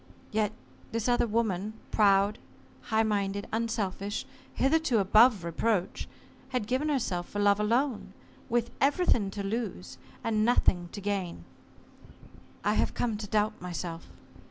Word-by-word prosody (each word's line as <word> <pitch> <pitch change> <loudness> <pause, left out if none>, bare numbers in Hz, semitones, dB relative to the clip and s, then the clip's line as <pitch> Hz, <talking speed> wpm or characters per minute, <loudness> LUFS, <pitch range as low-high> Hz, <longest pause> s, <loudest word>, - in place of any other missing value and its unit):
Yet 215 -1 +1 0.4
this 230 0 -1
other 240 -1 +3
woman, 215 -2 -1 0.2
proud, 200 0 +4 0.4
high 220 -1 +1
minded, 200 -2 -1
unselfish, 210 -3 -2 0.3
hitherto 285 -3 +2
above 215 +1 +5
reproach, 180 +3 -1 0.4
had 250 -5 -1
given 260 +7 0
herself 190 -11 -1
for - - -6
love 205 0 +4
alone 235 +4 0 0.4
with 235 -1 0
everything 275 - +3
to 200 +1 -5
lose 205 -3 -4 0.2
and 215 -1 +1
nothing 180 -7 +2
to 205 - -6
gain. 195 -3 -3 1.2
I - - +2
have - - 0
come 230 -3 0
to 205 0 -6
doubt 210 +1 0
myself. 175 -2 -5
215 Hz, 130 wpm, -29 LUFS, 195-235 Hz, 1.2 s, above